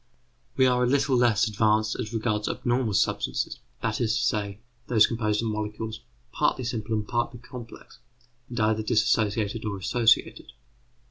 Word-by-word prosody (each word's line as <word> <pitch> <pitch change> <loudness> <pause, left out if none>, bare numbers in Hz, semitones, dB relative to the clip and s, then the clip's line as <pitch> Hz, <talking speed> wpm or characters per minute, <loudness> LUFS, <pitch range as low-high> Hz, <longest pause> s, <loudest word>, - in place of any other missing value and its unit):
We 130 - +5
are 125 -1 +3
a - - +2
little 135 +1 +2
less 115 -4 +3
advanced 110 0 +1
as 105 - -4
regards 110 -2 -1
abnormal 120 -4 0
substances; 105 -1 0 0.2
that 115 +1 -1
is 115 0 +1
to 120 - 0
say, 105 -4 -1 0.3
those 110 -3 +5
composed 110 -2 -1
of 115 - -1
molecules, 110 +1 -4 0.3
partly 130 - 0
simple 115 -2 -2
and 105 -1 -2
partly 120 0 -2
complex, 120 -1 -11 0.5
and 120 0 -4
either 110 0 +2
dissociated 110 0 +1
or 105 -2 -3
associated. 115 - +1
110 Hz, 150 wpm, -26 LUFS, 105-120 Hz, 0.5 s, We